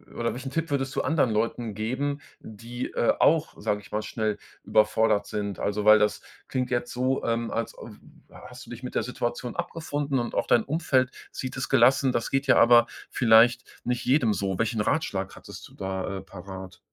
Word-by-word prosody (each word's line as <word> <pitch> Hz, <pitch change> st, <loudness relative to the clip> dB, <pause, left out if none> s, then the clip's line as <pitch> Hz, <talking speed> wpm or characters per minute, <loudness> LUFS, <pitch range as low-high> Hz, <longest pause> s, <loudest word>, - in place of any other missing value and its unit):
oder 115 Hz, 0 st, -1 dB
welchen 130 Hz, +2 st, -6 dB
Tipp 165 Hz, +1 st, -2 dB
würdest 135 Hz, -1 st, -1 dB
du -, -, +1 dB
anderen 150 Hz, -7 st, +1 dB
Leuten 110 Hz, 0 st, -1 dB
geben, 130 Hz, +7 st, -2 dB, 0.2 s
die, 115 Hz, +3 st, -7 dB
äh, 120 Hz, -, +2 dB
auch, 160 Hz, 0 st, +3 dB
sage 105 Hz, -1 st, -1 dB
ich 95 Hz, -, -17 dB
mal, 105 Hz, 0 st, -2 dB
schnell 110 Hz, -1 st, -2 dB, 0.3 s
überfordert 105 Hz, -1 st, +2 dB
sind? 100 Hz, -2 st, -4 dB
Also, 105 Hz, +1 st, -2 dB
weil 110 Hz, 0 st, +9 dB
das 105 Hz, -1 st, +1 dB, 0.3 s
klingt 130 Hz, -1 st, -2 dB
jetzt 120 Hz, -1 st, -1 dB
so, 130 Hz, +2 st, 0 dB
ähm, 115 Hz, 0 st, -1 dB
als 115 Hz, -, -3 dB
w -, -, -11 dB, 0.5 s
hast 125 Hz, -1 st, -12 dB
du -, -, -13 dB
dich 120 Hz, +1 st, -9 dB
mit 125 Hz, -, -6 dB
der -, -, +1 dB
Situation 120 Hz, 0 st, -4 dB
abgefunden 145 Hz, -5 st, -2 dB
und 120 Hz, -, -4 dB
auch -, -, +1 dB
dein 115 Hz, -, +3 dB
Umfeld 135 Hz, -4 st, +1 dB, 0.2 s
sieht 130 Hz, 0 st, -5 dB
es 130 Hz, -, -3 dB
gelassen. 135 Hz, 0 st, +4 dB
Das 115 Hz, -, -1 dB
geht 135 Hz, +1 st, 0 dB
ja 135 Hz, -, +5 dB
aber 120 Hz, 0 st, +7 dB, 0.2 s
vielleicht 120 Hz, +1 st, +5 dB, 0.2 s
nicht 125 Hz, -1 st, -2 dB
jedem 125 Hz, -4 st, +3 dB
so. 95 Hz, -2 st, -2 dB
Welchen 115 Hz, -1 st, 0 dB
Ratschlag 100 Hz, -7 st, -1 dB
hättest -, -, -11 dB
du -, -, -20 dB
da, 95 Hz, 0 st, -4 dB
äh, -, -, -6 dB
parat? 95 Hz, -1 st, -10 dB
120 Hz, 195 wpm, -26 LUFS, 105-130 Hz, 0.5 s, weil